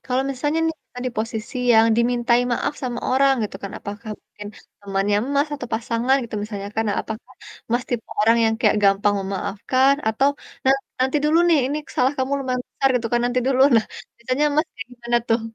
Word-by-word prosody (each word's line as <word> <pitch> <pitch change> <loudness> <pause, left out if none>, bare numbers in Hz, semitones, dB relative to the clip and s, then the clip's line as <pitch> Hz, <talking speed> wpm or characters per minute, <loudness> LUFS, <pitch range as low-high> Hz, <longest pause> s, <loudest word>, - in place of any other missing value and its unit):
kalau 255 +1 0
misalnya 290 +4 -1
nih 325 - -1
kita - - -13
di - - -1
posisi 220 +3 -4 0.2
yang 225 0 +6
dimintai 240 0 +2
maaf 240 - -1
sama 245 -2 -3
orang 270 +1 +4
gitu 200 -2 -4
kan, 195 0 -6
apakah 215 +2 -8
mungkin 205 - -12 0.3
temannya 200 0 0 0.2
Mas, 285 +2 +2
atau 255 -4 -7
pasangan 230 +3 +1
gitu 235 - -8
misalnya 205 -2 -5
kan, 225 - +1
nah 205 - 0
apakah 220 +1 -8 0.4
Mas, 240 +1 +2
tipe 240 -3 -2
orang 225 +2 +4
yang 225 0 +2
kayak 215 -3 +3
gampang 200 +1 +3
memaafkan 205 +8 +1
atau 265 +6 +2 0.4
nanti 270 +1 +5 0.2
"Nanti 265 +3 +2
dulu 310 +2 +4
nih 330 -3 +5
ini 285 +3 -2 0.2
salah 255 +2 +3
kamu 260 +1 -1
lumayan 255 -2 -2
besar," 270 - +1
gitu 240 -2 0
kan 240 - +3
nanti 245 +1 +1
dulu. 260 -1 +2 0.2
Nah, 220 - +3 0.3
biasanya 255 +5 -1
Mas 310 +2 +2
kayak 225 - -7
gimana 240 0 -1
tuh? 225 +1 +2
240 Hz, 195 wpm, -22 LUFS, 220-260 Hz, 0.4 s, yang